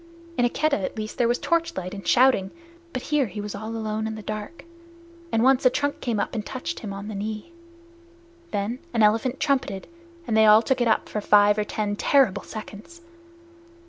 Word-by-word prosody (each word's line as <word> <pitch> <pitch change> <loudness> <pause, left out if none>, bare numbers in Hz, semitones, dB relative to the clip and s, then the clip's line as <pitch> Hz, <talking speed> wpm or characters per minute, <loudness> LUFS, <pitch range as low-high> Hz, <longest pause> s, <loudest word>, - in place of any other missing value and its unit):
In 245 - +2
a - - +3
Keddah 285 -6 0
at - - -4
least 215 +3 -5
there 240 - +4
was 240 +1 +2
torchlight 335 - -1
and 195 -1 -8
shouting, 245 -7 +4 0.4
but 255 - -4
here 285 -4 +3
he 205 +1 -7
was 205 0 -5
all 220 +1 -6
alone 220 -1 -3
in 220 - -4
the 215 - -8
dark, 215 +12 -6 0.7
and 225 0 +2
once 265 0 +4
a 255 - +7
trunk 285 +3 -2
came 230 -4 -1
up - - -2
and 220 -3 -3
touched 260 +9 -5
him 210 - -6
on 200 +1 -6
the 215 - -5
knee. 215 +8 -5 1.0
Then 210 +5 -2 0.2
an 225 - +4
elephant 225 +5 +2
trumpeted, 265 -10 0 0.4
and 225 - -1
they 220 0 +6
all 215 +2 +7
took 260 0 0
it 240 - +3
up 220 - +2
for 210 - -3
five 205 0 +5
or - - +2
ten 210 0 -2
terrible 215 -5 +3
seconds. 215 - -10
220 Hz, 205 wpm, -24 LUFS, 210-255 Hz, 1.0 s, a